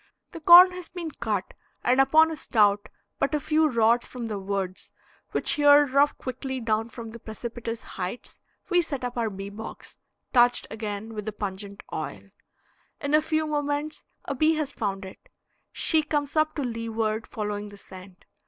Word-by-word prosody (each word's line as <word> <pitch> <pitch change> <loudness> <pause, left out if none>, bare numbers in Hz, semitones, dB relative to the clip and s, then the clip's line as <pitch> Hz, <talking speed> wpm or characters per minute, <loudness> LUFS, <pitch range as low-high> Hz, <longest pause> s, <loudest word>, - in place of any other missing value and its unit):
The - - -8
corn 350 +3 +9
has 360 -1 -8
been 340 -3 -6
cut, 215 -8 -3 0.3
and 255 +2 +4
upon 315 +4 +5
a - - -3
stout, 205 -7 +2 0.3
but 275 +2 +1
a - - +1
few 310 +1 +2
rods 235 -1 +3
from 245 -2 -6
the 210 -2 -3
woods, 195 -1 -4 0.4
which - - -1
here 290 -1 +6
drop 280 +2 +2
quickly 260 +1 -5
down 225 -1 -1
from 230 -1 -8
the 235 - -10
precipitous 230 +1 -6
heights, 185 +5 -6 0.3
we 355 0 +5
set 280 -5 -5
up 245 0 -3
our 230 -2 0
bee 195 0 -7
box, 220 +2 -9 0.4
touched 245 -1 +4
again 220 0 -5
with 210 -1 -6
the - - -1
pungent 200 -1 -6
oil. - - -6 0.7
In 285 0 -3
a 305 - +6
few 315 0 0
moments 295 0 -2 0.2
a - - -2
bee 310 +4 +3
has 300 -2 -2
found 195 -2 -3
it; 190 - -13 0.4
she 320 -2 +3
comes 295 -1 -2
up 310 0 +2
to 290 - -2
leeward, 225 -2 -2
following 210 -1 -4
the 205 - -13
scent. 185 -1 -13
240 Hz, 175 wpm, -26 LUFS, 210-295 Hz, 0.7 s, corn